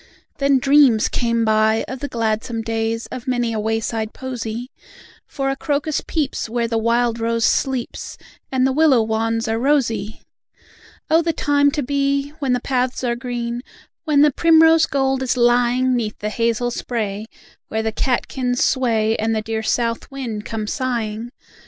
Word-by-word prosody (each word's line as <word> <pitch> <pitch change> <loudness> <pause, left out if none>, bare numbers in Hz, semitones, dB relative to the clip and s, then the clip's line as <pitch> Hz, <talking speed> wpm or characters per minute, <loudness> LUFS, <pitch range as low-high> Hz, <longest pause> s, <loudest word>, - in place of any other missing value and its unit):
Then 275 -1 +3
dreams 270 -4 +4
came 230 -1 0
by, 220 0 +2
of 260 0 -6
the 285 - -4
gladsome 225 -1 -2
days, 225 0 -2
Of 250 - -7
many 245 -2 0
a 220 - -2
wayside 220 0 -2
posy; 245 -1 -5 0.6
For 270 -1 -2
a - - -2
crocus 290 +1 -1
peeps 290 -7 -2
where 235 0 -1
the 230 -1 0
wild 235 +1 +1
rose 230 0 0
sleeps, 260 -3 -1 0.3
And 260 -1 +2
the 265 - +2
willow 275 -4 +4
wands 225 +1 -1
are 225 0 0
rosy! 230 -6 0 0.9
Oh! 325 +1 +5
the 330 0 -1
time 285 -1 +2
to 295 - -1
be! 280 +1 0
When 270 -4 0
the 250 - +1
paths 255 0 -1
are 240 -1 0
green, 240 -1 -4 0.4
When 295 -3 +4
the 300 - +5
primrose 325 +1 +5
gold 270 -1 0
is 255 -1 0
lying 245 +1 +3
'Neath 220 -3 -2
the 210 - -3
hazel 235 +2 0
spray, 215 -4 -3 0.4
where 220 0 -2
the 220 - -1
catkins 250 +1 -1
sway, 225 -4 +1
And 225 +1 0
the 215 - -1
dear 220 0 -3
south 230 +1 -1
wind 240 -7 -5
comes 215 -2 -3
sigh 245 -5 -1
ing. 225 +3 -7
240 Hz, 165 wpm, -20 LUFS, 225-270 Hz, 0.9 s, Oh